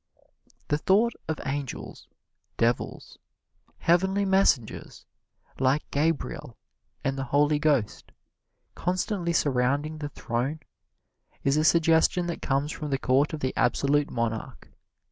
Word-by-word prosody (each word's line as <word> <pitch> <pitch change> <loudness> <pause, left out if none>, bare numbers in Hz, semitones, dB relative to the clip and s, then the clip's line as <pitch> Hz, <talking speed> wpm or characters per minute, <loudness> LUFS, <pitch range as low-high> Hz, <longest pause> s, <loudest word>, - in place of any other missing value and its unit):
The 150 - +1
thought 210 +7 +3
of 160 -1 -2
angels, 140 -1 -5 0.5
devils, 120 +1 -1 0.6
heavenly 190 +4 +2
messengers, 190 - +1 0.5
like 135 +3 +1
Gabriel 150 -3 -1 0.5
and 135 0 -1
the 135 - -2
Holy 145 +3 +2
Ghost, 145 -8 0 0.6
constantly 180 0 -1
surrounding 145 +1 0
the 145 -1 -4
Throne, 135 +4 -3 0.8
is 140 +1 +2
a 155 - +2
suggestion 165 +2 +3
that 170 -1 -4
comes 140 +2 0
from 150 -2 -5
the 135 - +1
court 135 +2 +2
of 155 - -5
the 130 - -1
absolute 140 +3 +2
monarch. 115 -2 -4
145 Hz, 115 wpm, -27 LUFS, 135-165 Hz, 0.8 s, thought